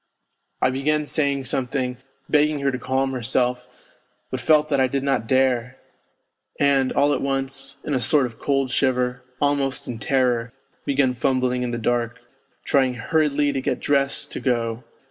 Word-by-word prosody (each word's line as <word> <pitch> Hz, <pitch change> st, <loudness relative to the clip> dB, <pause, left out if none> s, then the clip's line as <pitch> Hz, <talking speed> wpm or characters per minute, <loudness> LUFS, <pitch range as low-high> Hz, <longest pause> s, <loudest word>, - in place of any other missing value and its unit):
I 130 Hz, -, +4 dB
began 150 Hz, +3 st, 0 dB
saying 140 Hz, -2 st, 0 dB
something, 125 Hz, -1 st, -1 dB, 0.3 s
begging 150 Hz, 0 st, +3 dB
her 140 Hz, 0 st, +1 dB
to 130 Hz, -, -4 dB
calm 135 Hz, +1 st, 0 dB
herself, 125 Hz, 0 st, -1 dB, 0.6 s
but 130 Hz, -, -2 dB
felt 155 Hz, +3 st, +3 dB
that 140 Hz, -2 st, +1 dB
I 130 Hz, -, +4 dB
did 135 Hz, +1 st, -2 dB
not 135 Hz, -5 st, 0 dB
dare; 130 Hz, -1 st, +1 dB, 0.8 s
and 140 Hz, -2 st, +3 dB
all 145 Hz, +1 st, +3 dB
at -, -, -1 dB
once, 135 Hz, 0 st, -2 dB
in 150 Hz, -, -3 dB
a 130 Hz, -, +1 dB
sort 145 Hz, 0 st, +3 dB
of 115 Hz, -2 st, -8 dB
cold 135 Hz, -2 st, 0 dB
shiver, 125 Hz, -1 st, +1 dB, 0.2 s
almost 140 Hz, -2 st, 0 dB
in 120 Hz, -2 st, -5 dB
terror, 125 Hz, 0 st, 0 dB, 0.3 s
began 135 Hz, -2 st, +2 dB
fumbling 125 Hz, 0 st, 0 dB
in 125 Hz, -, -1 dB
the 120 Hz, -, -3 dB
dark, 120 Hz, +1 st, -1 dB, 0.5 s
trying 130 Hz, -2 st, +2 dB
hurriedly 145 Hz, +2 st, +1 dB
to 135 Hz, -1 st, -2 dB
get -, -, -1 dB
dressed 140 Hz, -1 st, 0 dB
to -, -, -5 dB
go. 115 Hz, -2 st, -1 dB
130 Hz, 165 wpm, -23 LUFS, 125-140 Hz, 0.8 s, I